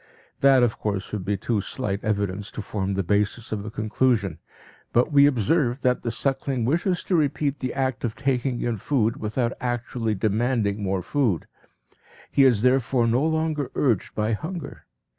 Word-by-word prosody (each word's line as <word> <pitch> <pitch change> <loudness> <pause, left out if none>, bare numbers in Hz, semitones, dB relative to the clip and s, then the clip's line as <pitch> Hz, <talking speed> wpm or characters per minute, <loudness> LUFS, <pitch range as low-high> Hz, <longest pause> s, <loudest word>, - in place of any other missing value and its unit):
That 135 -2 +5
of 115 -2 0
course 100 -3 -3
would 105 -3 -3
be 105 0 0
too 105 +1 -1
slight 100 -3 -3
evidence 100 -1 -1
to 110 - -5
form 100 -2 -2
the 95 0 -1
basis 105 +5 0
of 105 -2 -3
a 110 - -5
conclusion. 110 -4 0 0.5
But 120 +6 +3
we 140 -1 +7
observe 130 - +1
that 125 -1 +1
the 120 - -2
suckling 135 0 -1
wishes 175 - 0
to 185 - 0
repeat 145 -2 0
the 130 -2 -3
act 130 -1 -1
of 115 -3 -2
taking 130 -2 -1
in 120 -2 -1
food 115 0 0
without 115 +3 -1
actually 120 -2 -2
demanding 110 0 0
more 95 -2 -1
food; 120 - 0 0.9
he 135 - +5
is 120 -5 +4
therefore 125 -1 +3
no 120 +4 +2
longer 160 -3 0
urged 120 -9 0
by 110 +1 0
hunger. 160 - -6
120 Hz, 170 wpm, -24 LUFS, 105-135 Hz, 0.9 s, we